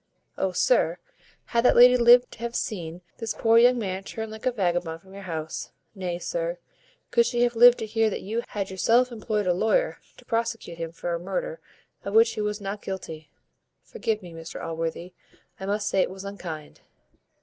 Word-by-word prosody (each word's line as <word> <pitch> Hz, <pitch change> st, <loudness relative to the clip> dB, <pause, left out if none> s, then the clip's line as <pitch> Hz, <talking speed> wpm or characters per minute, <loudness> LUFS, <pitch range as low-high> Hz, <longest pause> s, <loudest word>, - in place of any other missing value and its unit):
Oh! 190 Hz, -, -1 dB
sir, 180 Hz, -4 st, +2 dB, 0.5 s
had 235 Hz, 0 st, 0 dB
that -, -, +5 dB
lady 250 Hz, +1 st, +8 dB
lived 245 Hz, 0 st, +6 dB
to -, -, -13 dB
have 235 Hz, 0 st, -4 dB
seen 175 Hz, -5 st, -4 dB, 0.2 s
this 225 Hz, -1 st, -3 dB
poor 225 Hz, 0 st, +4 dB
young 245 Hz, +1 st, +6 dB
man 195 Hz, -4 st, -3 dB
turned 220 Hz, +2 st, -6 dB
like 220 Hz, +3 st, -5 dB
a -, -, +3 dB
vagabond 175 Hz, -6 st, -1 dB
from 190 Hz, +3 st, -18 dB
your 200 Hz, -, -9 dB
house: 160 Hz, -1 st, -4 dB, 0.2 s
nay, 180 Hz, -4 st, -3 dB
sir, -, -, -3 dB, 0.5 s
could 470 Hz, -, +5 dB
she 240 Hz, -1 st, +1 dB
have 240 Hz, -1 st, +1 dB
lived 245 Hz, +1 st, +8 dB
to -, -, -4 dB
hear 220 Hz, 0 st, +1 dB
that -, -, -5 dB
you 225 Hz, +4 st, -2 dB
had 200 Hz, -2 st, -4 dB
yourself 235 Hz, +6 st, +3 dB
employed 215 Hz, -2 st, -2 dB
a 180 Hz, -, +3 dB
lawyer 220 Hz, -, +1 dB, 0.2 s
to -, -, -17 dB
prosecute 230 Hz, -7 st, -2 dB
him 165 Hz, -1 st, -4 dB
for 170 Hz, +1 st, -4 dB
a 170 Hz, -, -2 dB
murder -, -, -4 dB, 0.4 s
of 200 Hz, +1 st, -4 dB
which 225 Hz, 0 st, +6 dB
he 215 Hz, -, -4 dB
was 210 Hz, 0 st, -2 dB
not 200 Hz, +1 st, -5 dB
guilty 160 Hz, -5 st, -7 dB, 0.5 s
Forgive 215 Hz, -2 st, -3 dB
me, 175 Hz, -2 st, -10 dB
Mr 165 Hz, 0 st, -8 dB
Allworthy, 165 Hz, +2 st, -4 dB, 0.5 s
I 190 Hz, -, -5 dB
must 205 Hz, +1 st, -1 dB
say 190 Hz, -, +2 dB
it -, -, +1 dB
was 190 Hz, +1 st, -9 dB
unkind. 170 Hz, -6 st, -7 dB
210 Hz, 195 wpm, -26 LUFS, 180-235 Hz, 0.5 s, lady